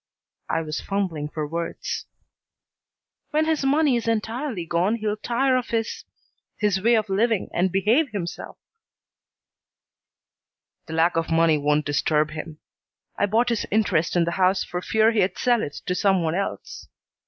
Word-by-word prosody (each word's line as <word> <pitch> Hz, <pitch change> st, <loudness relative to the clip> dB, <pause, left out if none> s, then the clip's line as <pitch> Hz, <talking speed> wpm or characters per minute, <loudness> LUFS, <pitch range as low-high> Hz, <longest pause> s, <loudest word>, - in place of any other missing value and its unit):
I -, -, +1 dB
was 155 Hz, -1 st, -4 dB
fumbling 180 Hz, -7 st, -2 dB
for 155 Hz, 0 st, -3 dB
words. 170 Hz, +2 st, -4 dB, 1.2 s
"When 310 Hz, +1 st, +1 dB
his 315 Hz, -3 st, 0 dB
money 285 Hz, 0 st, +3 dB
is 235 Hz, -1 st, -2 dB
entirely 225 Hz, -, -2 dB
gone 175 Hz, +6 st, +1 dB
he'll 215 Hz, -2 st, -2 dB
tire 255 Hz, +4 st, +1 dB
of 250 Hz, -1 st, -1 dB
his 225 Hz, -1 st, -3 dB, 0.5 s
his 200 Hz, -2 st, +1 dB
way 235 Hz, +3 st, +4 dB
of 215 Hz, -1 st, +1 dB
living 215 Hz, +2 st, +1 dB
and 180 Hz, +1 st, +1 dB
behave 225 Hz, -, +2 dB
himself." 195 Hz, -6 st, -6 dB, 2.3 s
"The 160 Hz, -, -7 dB
lack 165 Hz, +1 st, +2 dB
of 165 Hz, -, -1 dB
money 165 Hz, -1 st, +4 dB
doesn't 150 Hz, +1 st, +1 dB
disturb 150 Hz, +1 st, +1 dB
him. 155 Hz, 0 st, -7 dB, 0.6 s
I 205 Hz, -, +1 dB
bought 230 Hz, +4 st, +2 dB
his 235 Hz, -2 st, -1 dB
interest 190 Hz, -7 st, +1 dB
in 175 Hz, -, +4 dB
the 170 Hz, -, -1 dB
house 185 Hz, +1 st, +3 dB
for 180 Hz, -, -5 dB
fear 220 Hz, +3 st, +3 dB
he'd 205 Hz, -4 st, +1 dB
sell 240 Hz, -3 st, +2 dB
it 145 Hz, -, -4 dB
to 180 Hz, -, 0 dB
some 190 Hz, -1 st, +2 dB
one 160 Hz, -1 st, 0 dB
else. 195 Hz, +3 st, -4 dB
195 Hz, 155 wpm, -24 LUFS, 165-230 Hz, 2.3 s, way